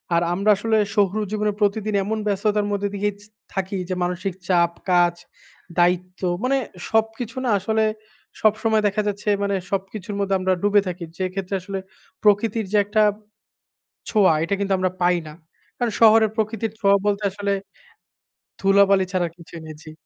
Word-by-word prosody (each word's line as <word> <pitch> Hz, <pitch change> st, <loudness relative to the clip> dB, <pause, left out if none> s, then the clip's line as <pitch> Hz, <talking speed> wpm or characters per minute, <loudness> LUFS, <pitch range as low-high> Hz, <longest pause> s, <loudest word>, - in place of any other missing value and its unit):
আর 170 Hz, -, +3 dB
আমরা 200 Hz, +4 st, 0 dB
আসলে 220 Hz, +2 st, +1 dB, 0.2 s
শহুর 205 Hz, 0 st, +2 dB
জীবনে 210 Hz, 0 st, 0 dB
প্রতিদিন 210 Hz, +1 st, 0 dB
এমন 220 Hz, +3 st, -2 dB
ব্যস্ততার 205 Hz, +1 st, +1 dB
মধ্যে 205 Hz, 0 st, -1 dB
দিয়েই 205 Hz, +1 st, -1 dB
জ -, -, -16 dB, 0.3 s
থাকি। 195 Hz, +1 st, -2 dB
যে, -, -, 0 dB
মানসিক 180 Hz, +2 st, -2 dB
চাপ, 170 Hz, -2 st, +3 dB, 0.2 s
কাজ, 175 Hz, -1 st, +4 dB, 0.6 s
দায়িত্ব 180 Hz, +1 st, +1 dB, 0.2 s
মানে 270 Hz, +2 st, +2 dB, 0.3 s
সবকিছু 225 Hz, +2 st, -1 dB
না -, -, +1 dB
আসলে, 220 Hz, +3 st, 0 dB, 0.6 s
সবসময় 220 Hz, 0 st, +3 dB
দেখা 205 Hz, +1 st, 0 dB
যাচ্ছে, 205 Hz, +1 st, -2 dB
মানে 200 Hz, 0 st, 0 dB, 0.2 s
সবকিছুর 195 Hz, +1 st, -4 dB
মধ্যে 195 Hz, -1 st, +1 dB
আমরা 185 Hz, 0 st, +1 dB
ডুবে 205 Hz, 0 st, +4 dB
থাকি। 180 Hz, -1 st, -5 dB
যেক্ষেত্রে 185 Hz, +1 st, -3 dB
আসলে 195 Hz, +1 st, -5 dB, 0.4 s
প্রকৃতির 210 Hz, +1 st, +2 dB
যে 210 Hz, -, +3 dB
একটা 210 Hz, +2 st, +2 dB, 1.1 s
ছোঁয়া, 200 Hz, -6 st, +4 dB
এটা 180 Hz, +4 st, 0 dB
কিন্তু 195 Hz, -1 st, 0 dB
আমরা 185 Hz, -1 st, 0 dB
পাই 175 Hz, 0 st, +3 dB
না। 150 Hz, -, -9 dB, 0.4 s
কারণ 240 Hz, -2 st, 0 dB
শহরের 220 Hz, -1 st, +7 dB
প্রকৃতির 220 Hz, 0 st, -1 dB
ছোঁয়া 200 Hz, 0 st, +4 dB
বলতে 205 Hz, 0 st, 0 dB
আসলে 200 Hz, 0 st, -2 dB, 1.1 s
ধুলাবালি 195 Hz, -1 st, +4 dB
ছাড়া 180 Hz, -2 st, 0 dB
কিছু 170 Hz, 0 st, -14 dB
নেই। 155 Hz, -1 st, -8 dB
জি। 155 Hz, -, -10 dB
200 Hz, 155 wpm, -22 LUFS, 185-215 Hz, 1.1 s, শহরের